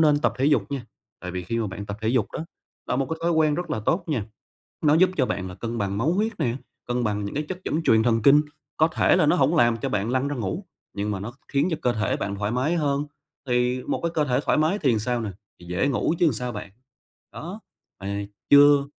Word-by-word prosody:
nên 150 -2 +5
tập - - +1
thể 135 - +1
dục 145 -1 +2
nha, 135 -4 -4 0.3
tại 90 - -5
vì 90 0 -4
khi 115 +5 -2
mà 110 - 0
bạn 100 +1 -6
tập 100 - -5
thể 110 - -1
dục 120 -4 +1
đó 160 - -4 0.4
là 125 - 0
một 135 -1 0
cái 160 - -2
thói 170 - +2
quen 155 -2 +3
rất 175 +3 -4
là 110 - -1
tốt 170 - 0
nha, 125 -10 -1 0.6
nó 150 -1 +4
giúp 185 +3 +5
cho 130 - +3
bạn 95 -6 -3
là 90 - -9
cân 115 +4 -4
bằng 100 -2 -1
máu 150 +10 +1
huyết 215 +3 -1
nè, 120 -1 0 0.3
cân 125 0 0
bằng 105 -2 -1
những 100 - -5
cái 150 - 0
chất 180 +4 -7
dẫn 160 +3 0
truyền 110 -5 +4
thần 115 -1 +2
kinh, 145 +4 +7 0.4
có 155 - +5
thể 165 - +3
là 175 -4 +4
nó 150 - +4
hổng 150 +1 +3
làm 120 -6 +4
cho - - -3
bạn 105 +2 -1
lăn 130 +2 +1
ra 145 - -2
ngủ, 120 - -3 0.3
nhưng 105 +1 -2
mà 95 - -3
nó 115 +5 -6
khiến 140 +4 +1
cho 160 - 0
cơ 120 -1 +2
thể 110 0 0
bạn 100 0 -3
thoải 105 +1 -2
mái 130 +8 +1
hơn, 145 -3 0 0.4
thì 125 +1 +1
một - - -2
cái 170 - 0
cơ 155 -2 +2
thể 125 -2 +1
thoải - - +3
mái 160 +7 +2
thì 125 - +2
sao 120 +2 -1
nè? 110 - -3 0.3
Thì 85 - -13
dễ 90 +9 0
ngủ 140 +3 +1
chứ - - +4
làm 150 - +3
sao 125 +2 -3
bạn. 105 -3 -7 0.6
Đó, 180 +7 -7 0.4
mà 100 +1 -3 0.2
chưa 145 0 +7
125 Hz, 265 wpm, -25 LUFS, 110-150 Hz, 0.6 s, kinh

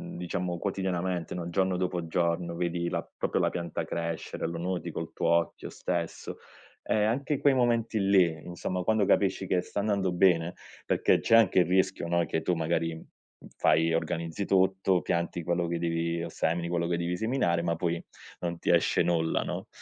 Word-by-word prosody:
diciamo, 90 0 -3
quotidianamente, 90 -2 -2
no, 85 -1 -4
giorno 95 +1 +1
dopo 90 -2 -2
giorno 85 0 0
vedi 85 0 -1
la - - -2
proprio - - 0
la - - +2
pianta 85 -2 -3
crescere, 85 -1 -4
lo 85 0 -4
noti 90 0 -3
col 80 0 -5
tuo - - -2
occhio 85 -1 +1
stesso. 85 -1 -4 0.5
Ehm, 105 0 +2
anche 140 +5 -1
quei 140 - +4
momenti 120 -3 +1
lì, 95 -3 +4
insomma, 90 +1 -3
quando 110 +1 +2
capisci 95 0 +2
che 95 -1 +1
sta 100 - -3
andando 100 -3 0
bene 90 -1 +3 0.3
perché - - +3
c'è 115 - +3
anche 110 -5 +5
il 90 - +5
rischio, 95 0 +1
no, 85 0 +2
che 80 - -2
tu 90 - +1
magari, 80 0 0
mhmm, 80 - -11 0.5
fai, 80 +1 +3
organizzi 85 +2 -2
tutto, 95 -1 +2
pianti 85 0 -2
quello 85 +1 0
che 85 0 -1
devi 85 0 -1
o 85 - -4
semini 85 +2 -1
quello 85 -1 0
che 85 0 0
devi 85 +1 -1
seminare, 110 -7 +1
ma 85 -1 0
poi 85 0 -2 0.4
non 85 -1 -3
ti - - -3
esce - - +3
nulla, 80 -1 +1
no? - - -5
85 Hz, 180 wpm, -28 LUFS, 85-95 Hz, 0.5 s, anche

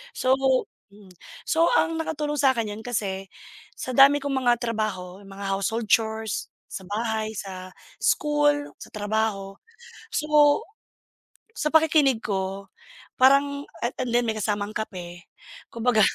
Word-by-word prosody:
So 255 - +1 0.6
mm. 200 -2 -17 0.4
So, 330 +2 +3
ang 325 0 +2
nakatulong 295 -2 -2
sakin, 250 -6 +2
‘yan 205 - -7
kasi 195 -5 -3 0.5
sa 255 - -5
dami 275 +2 +7
kong 285 - -2
mga 245 -2 +2
trabaho, 205 -5 -3
mga 195 +1 -9
household 215 +3 -1
chores, 220 -1 +1 0.2
sa 190 - -6
bahay, 220 +1 -2
sa 185 -2 -7 0.3
school, 295 -1 +2
sa - - -10
trabaho. 205 -2 -2 0.6
So, 300 -1 +4 1.0
sa 300 - -1
pakikinig 305 -6 +4
ko 195 -1 -3 0.5
parang 280 +2 +4 0.2
a 240 - -2
a - - -3
and 250 - -4
then 240 0 +3
may 225 - 0
kasamang 210 0 -2
kape, 175 -5 -6 0.4
kumbaga 230 -1 +1
220 Hz, 130 wpm, -25 LUFS, 200-280 Hz, 1.0 s, dami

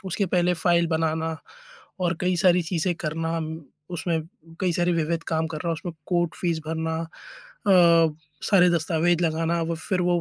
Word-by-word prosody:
उसके 190 +2 -1
पहले 180 0 +2
फाइल 170 0 +2
बनाना 160 0 -1 0.6
और 175 -1 +1
कई 180 0 +1
सारी 180 0 +4
चीज़ें 170 +1 -1
करना, 165 +1 -2 0.5
उसमें 170 -1 -1 0.4
कई 180 -2 +1
सारे 175 0 +1
विविध 165 0 -1
काम 160 0 0
करना, 160 +2 -4
उसमें 175 +1 -5
कोर्ट 175 -2 0
फ़ीस 170 -3 -1
भरना, 160 0 -2 0.7
अ, 170 -4 +5 0.3
सारे 180 -3 +6
दस्तावेज़ 170 +1 +1
लगाना 165 +1 0
और 165 0 -2
फिर 180 +3 -2
वो 175 -1 +2
170 Hz, 155 wpm, -25 LUFS, 160-175 Hz, 0.7 s, सारे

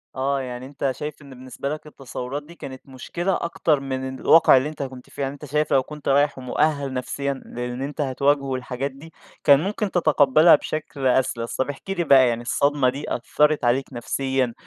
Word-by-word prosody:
آه، 135 +1 0
يعني 125 0 -6
أنت 135 -1 -2
شايف 150 +1 -6
إن 140 - -14
بالنسبة 130 +1 -6
لك 155 0 -6
التصوّرات 135 0 -6
دي 170 +3 -14
كانت 130 -4 -9
مشكلة 175 +8 -2
أكتر 160 -3 +1
من 130 -1 -4
الواقع 160 -4 +6
اللي 140 +4 0
أنت 150 -2 -5
كنت 130 -2 -9
فيه. - - -8
يعني 135 0 -1
أنت 145 +1 -10
شايف 150 +2 0
لو 135 -1 +4
كنت 150 +1 -10
رايح 145 +1 +3
ومؤهَل 140 +2 0
نفسيًا 140 +2 -2
للي 125 +2 -5
أنت 145 +1 -5
هتواجهه 140 +1 +1
والحاجات 130 +1 -3
دي، 155 +4 -14 0.3
كان 140 -1 +7
ممكن 205 +3 -2
تتقبلها 155 -1 +5
بشكل 145 -3 -3
أسلس. 125 -2 0
طب، 130 +2 -1
احكِ 145 +7 -8
لي 185 -3 0
بقى، 135 -5 +6
يعني 120 0 -1
الصدمة 140 +2 +2
دي 140 +3 -4
أثّرت 150 +4 +1
عليك 130 +3 +1
نفسيًا، 130 +1 -1
140 Hz, 190 wpm, -23 LUFS, 130-150 Hz, 0.3 s, كان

